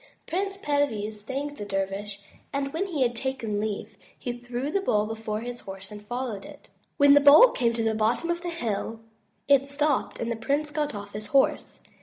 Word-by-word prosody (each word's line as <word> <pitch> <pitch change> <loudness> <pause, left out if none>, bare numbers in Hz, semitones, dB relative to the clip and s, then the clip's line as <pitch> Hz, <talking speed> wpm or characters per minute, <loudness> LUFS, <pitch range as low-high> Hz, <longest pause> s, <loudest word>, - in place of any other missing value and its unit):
Prince 390 +3 -2
Perviz 225 - -1
thanked 280 +6 -4
the - - -5
dervish 200 +1 -3 0.3
and 275 -1 -2
when 370 +5 -1
he 310 -8 0
had 240 -1 0
taken 230 -4 -2
leave, 210 -1 -4 0.2
he 245 - -4
threw 245 +3 -4
the 395 - +1
bowl 210 - +2
before 220 -1 -4
his 245 +1 -6
horse 195 +1 -9
and 210 0 -8
followed 240 -3 -4
it. 290 0 -13 0.3
When 285 0 +7
the 290 - +7
bowl 295 - +9
came 235 -3 +1
to 230 - -1
the 225 0 +2
bottom 225 +10 +1
of 345 0 -2
the 350 - -3
hill, 225 -7 -3 0.5
it 280 -1 +4
stopped 290 -1 0
and 235 0 -2
the - - 0
prince 285 +6 -1
got 295 -4 -1
off 205 0 -8
his 210 +1 -6
horse. 275 +3 +1
245 Hz, 200 wpm, -27 LUFS, 215-290 Hz, 0.5 s, bowl